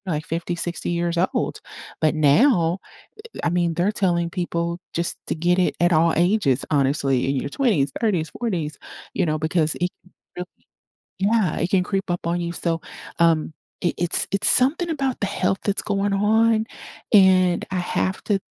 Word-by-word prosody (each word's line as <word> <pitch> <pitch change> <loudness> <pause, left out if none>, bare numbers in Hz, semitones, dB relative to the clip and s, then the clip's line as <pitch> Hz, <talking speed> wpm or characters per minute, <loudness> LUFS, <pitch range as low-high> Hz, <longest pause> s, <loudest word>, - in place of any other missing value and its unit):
like, 155 -3 -3
50, 170 +1 -3
60 175 0 -3
years 170 0 -1 0.2
old. - - -2 0.4
But 155 -1 +2
now, 165 - +3 0.6
eh - - -9
I - - +2
mean, 175 -1 +1
they're 180 +5 +1
telling 175 -5 0
people 170 -1 -3
just 170 +1 -1
to - - -1
get 175 +3 +1
it 180 - +1
at 175 +1 +3
all 165 +1 +3
ages, 175 - +2
honestly, 135 -2 +1
in 140 - 0
your 140 - -3
20s, 170 - +1
30s, 180 -9 0
40s, 170 -11 -3 0.3
you 185 - 0
know, 155 -1 0
because 155 0 +1
it 180 - +1 0.5
really 180 - -4 0.7
Yeah, 200 -3 +1
it 170 - -1
can 185 -2 +3
creep 195 -2 -3
up 175 -1 -3
on 170 +1 0
you, 170 0 -3
so, 165 -1 -2 0.4
um, 165 -2 +2 0.3
it 175 - 0
it's 175 -1 +2
it's 200 +1 +3
something 285 +7 +3
about 270 -5 -2
the 200 - 0
health 190 -1 -1
that's 200 -1 +1
going 200 -1 -1
on, 220 +2 +3 0.5
and 185 -3 +5
I 185 - -2
have 185 +1 -2
to 205 -2 +1
175 Hz, 175 wpm, -22 LUFS, 165-195 Hz, 0.7 s, and